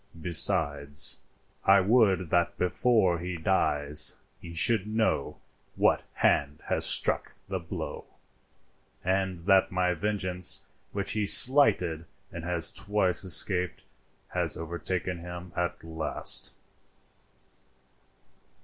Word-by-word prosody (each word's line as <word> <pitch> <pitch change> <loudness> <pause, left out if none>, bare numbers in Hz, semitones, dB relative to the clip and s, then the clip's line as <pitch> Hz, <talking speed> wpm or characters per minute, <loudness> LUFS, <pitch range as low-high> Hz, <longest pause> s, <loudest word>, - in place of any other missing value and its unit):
Besides, 75 -4 +1 0.4
I 100 +1 +5
would 95 -4 +1
that 85 -2 0
before 90 -1 +1
he 90 +1 -6
dies 75 -4 +1 0.2
he 85 - -11
should 105 +4 +2
know 110 -9 -2 0.4
what - - +1
hand 70 +1 0
has - - -1
struck - - -1
the 95 -1 -4
blow, 85 -2 -8 1.0
and 95 -2 -2
that 95 -1 +3
my 90 0 0
vengeance, 90 -1 -1 0.3
which 100 -1 -3
he 105 -1 -2
slighted 100 - +7 0.2
and 85 - -8
has 85 -2 -1
twice 100 -3 0
escaped, 90 0 0 0.5
has - - -2
overtaken 85 +2 -5
him 90 +1 -10
at 85 -1 -4
last." 80 -1 -1
90 Hz, 105 wpm, -27 LUFS, 85-95 Hz, 1.0 s, slighted